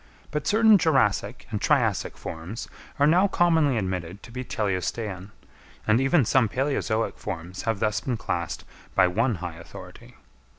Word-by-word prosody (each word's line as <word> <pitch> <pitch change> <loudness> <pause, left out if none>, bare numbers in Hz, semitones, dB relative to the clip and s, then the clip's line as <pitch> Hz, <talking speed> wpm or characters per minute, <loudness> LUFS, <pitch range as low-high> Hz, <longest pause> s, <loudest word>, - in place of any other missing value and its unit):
But 150 -1 -3
certain 220 -1 +6
Jurassic 135 - +1
and - - -2
Triassic - - +1
forms 85 +8 -7 0.3
are 145 - +4
now 175 +6 +5
commonly 160 -8 +3
admitted 95 -2 -4
to - - -12
be 125 +2 -5
teleostean; 100 -2 -3 0.6
and 110 +3 +3
even 135 0 +3
some 120 -1 +3
palæozoic 125 -3 -1
forms 90 +2 -6
have 115 -3 0
thus 110 0 0
been 125 -3 -2
classed 85 -5 -3 0.3
by 95 - +6
one 115 +6 +1
high 85 -2 -6
authority. 85 - -12
115 Hz, 145 wpm, -25 LUFS, 95-140 Hz, 0.6 s, certain